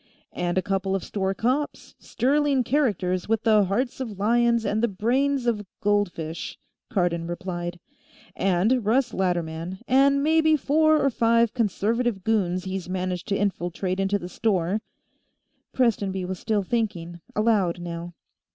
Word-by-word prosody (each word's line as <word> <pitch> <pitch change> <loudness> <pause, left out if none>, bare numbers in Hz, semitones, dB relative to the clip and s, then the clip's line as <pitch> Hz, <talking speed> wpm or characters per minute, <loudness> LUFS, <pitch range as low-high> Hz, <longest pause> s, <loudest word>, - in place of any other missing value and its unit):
"And 175 0 -2
a 185 - +2
couple 195 0 -1
of 190 - -2
store 195 -1 -2
cops, 260 +8 -2
sterling 280 0 +1
characters 205 - 0
with 225 -1 +1
the 215 -3 +4
hearts 240 +8 -1
of 225 -7 -5
lions 235 +2 +2
and 215 +1 0
the 235 - +3
brains 250 +6 0
of 225 -3 0 0.2
goldfish," 180 -6 -1 0.3
Cardon 175 -4 0
replied. 175 0 -5 0.6
"And 195 +7 +2
Russ 240 +3 +1
Latterman, 175 -1 -2
and 275 +2 +4
maybe 315 0 +4
four 310 +2 +3
or 275 -1 +2
five 230 -1 +3
Conservative 225 -1 0
goons 185 -5 +1
he's 190 -2 -5
managed 185 0 -3
to 200 -2 0
infiltrate 185 -1 -2
into 195 +1 +1
the 175 - -7
store." 195 -1 0 0.9
Prestonby 200 -7 0
was 185 0 -5
still 210 -3 0
thinking, 175 -6 -3
aloud, 205 -6 +2
now. 170 0 -6
205 Hz, 140 wpm, -25 LUFS, 180-235 Hz, 0.9 s, the